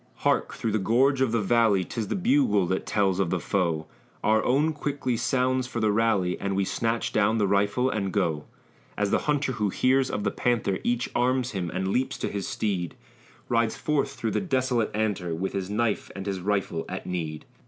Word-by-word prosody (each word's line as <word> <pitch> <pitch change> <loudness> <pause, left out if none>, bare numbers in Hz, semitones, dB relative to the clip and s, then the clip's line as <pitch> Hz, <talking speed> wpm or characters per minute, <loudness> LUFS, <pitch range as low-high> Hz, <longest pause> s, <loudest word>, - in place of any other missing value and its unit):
Hark! - - +2
through 115 - -2
the 110 - +1
gorge 130 +7 +3
of 130 -4 +2
the 115 -2 +1
valley, 110 -3 +3
'Tis 110 +3 -4
the - - -2
bugle 240 - +3
that 95 +2 -2
tells 100 -3 +1
of 95 -4 +1
the 95 - 0
foe; 85 -4 0 0.4
Our 110 0 +3
own 150 +5 +2
quickly 140 -4 -2
sounds 130 +2 +1
for 120 - -4
the 110 -2 +2
rally, 100 -5 +1
And 100 -1 -2
we 100 0 +1
snatch 115 +3 -1
down 110 +1 +3
the 105 - +2
rifle 100 +6 +2
and 100 -6 -1
go. 75 -4 0 0.5
As 105 -1 0
the - - +3
hunter 145 -2 +1
who 105 -4 -1
hears 130 +6 +2
of 105 - -2
the 100 - 0
panther, 115 -6 0
Each 120 +1 0
arms 125 +1 +1
him 90 -4 -3
and 95 +3 -2
leaps 130 +6 0
to - - -2
his 100 -2 -4
steed, 95 -6 -2 0.5
Rides 115 -2 +1
forth 145 -2 0
through 115 -5 -3
the - - 0
desolate 130 - 0
antre, 100 -6 -1
With 95 +3 -3
his 95 -1 -3
knife 110 +1 0
and 95 -1 -6
his 100 -2 -2
rifle 95 -3 -1
at - - -5
need. 80 -4 -4
110 Hz, 205 wpm, -26 LUFS, 95-125 Hz, 0.5 s, gorge